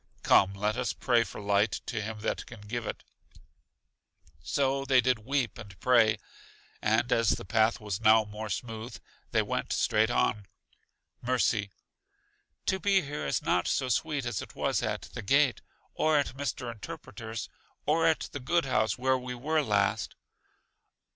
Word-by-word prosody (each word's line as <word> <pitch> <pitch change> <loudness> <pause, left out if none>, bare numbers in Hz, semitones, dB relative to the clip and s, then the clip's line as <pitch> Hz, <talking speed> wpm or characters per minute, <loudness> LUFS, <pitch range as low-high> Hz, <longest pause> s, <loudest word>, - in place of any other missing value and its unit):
Come, 100 0 +5
let 105 +3 -1
us 125 -1 -1
pray 120 -2 +2
for - - -9
light 100 +1 +2
to 115 -4 -3
Him 110 0 -6
that - - -2
can 115 -4 -11
give 110 +2 -4
it. - - -5 1.4
So 135 - 0
did 130 -2 +4
they 130 - +4
weep 125 -1 -1
and 100 -5 -11
pray. 115 -4 +4 0.6
And 110 +3 +1
as 115 -2 +3
the - - -8
path 110 +5 +2
was 105 -2 -4
now 110 0 +6
more 105 +1 -6
smooth, 115 +3 -5 0.3
they - - +2
went - - -3
straight 110 +1 +2
on. 105 -4 +1 0.7
Mercy: 120 -4 +1 1.0
To 190 - +1
be 195 -1 +3
here 145 - -4
is 70 - 0
not 90 - +1
so 130 -2 0
sweet 140 +2 0
as 120 -4 -2
it - - -10
was - - 0
at - - -2
The - - -5
Gate, 140 +4 +3 0.3
or 155 -1 +2
at 140 -3 0
Mr. 135 -3 -3
Interpreter's, 115 -3 -7 0.4
or 165 +2 +3
at 160 - +2
the 140 - -5
good 170 +5 +1
house 110 -5 +1
where 130 +1 +2
we 125 0 -6
were 155 +6 +1
last. 100 -7 0
120 Hz, 160 wpm, -29 LUFS, 105-135 Hz, 1.4 s, now